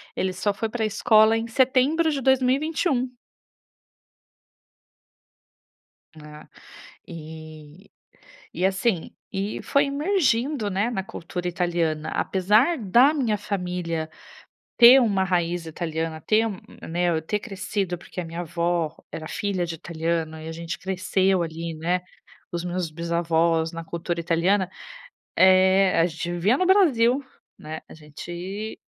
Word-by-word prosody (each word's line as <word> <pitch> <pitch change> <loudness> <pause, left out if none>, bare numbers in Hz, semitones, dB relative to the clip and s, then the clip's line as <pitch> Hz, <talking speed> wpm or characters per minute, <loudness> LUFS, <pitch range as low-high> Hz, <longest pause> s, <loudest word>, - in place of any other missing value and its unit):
ele 185 0 -1
só 200 +2 -1
foi 225 +2 -2
para 225 -1 -2
escola 220 +1 +4
em 230 +1 -3
setembro 265 +7 +2
de 280 - -2
2021. 265 0 +1 3.0
Né, 150 0 -12 0.6
e 155 +2 -11 0.7
e 185 - -2
assim, 190 -1 0 0.2
e 195 +2 -3
foi 280 +1 +2
emergindo, 280 - 0
né, 200 +5 0
na 195 -5 -2
cultura 180 0 -6
italiana, 170 -3 -1
apesar 215 - +2
da 240 +8 +4
minha 235 -7 0
família 180 -5 -3 0.7
ter 245 +3 +9
uma 200 -5 +2
raiz 175 -2 -1
italiana, 160 -1 -4
ter 215 +6 +2
m 205 -4 -4 0.2
m - - -9
né, 175 +1 +1
eu 160 -1 0
ter 210 +5 -2
crescido 195 -4 -3
porque 180 - -8
a - - -5
minha 165 +1 -6
avó 170 -1 -1 0.2
era 155 - -6
filha 190 -4 -2
de 165 - -5
italiano 160 -1 -3
e 160 - -9
a - - -5
gente 170 +2 -6
cresceu 190 0 +1
ali, 165 0 -5
né, 175 +3 0 0.5
os 175 0 -3
meus 180 -1 -2
bisavós 165 0 0
na 165 0 -6
cultura 170 +1 -4
italiana, 175 +3 +1 0.7
eh, 190 0 +5
a - - +5
gente 170 +1 -5
vivia 195 +9 +2
no 370 - +1
Brasil, 280 - +4 0.3
né, 155 +1 -7
a - - -12
gente 175 +7 -7
185 Hz, 135 wpm, -24 LUFS, 165-220 Hz, 3.0 s, ter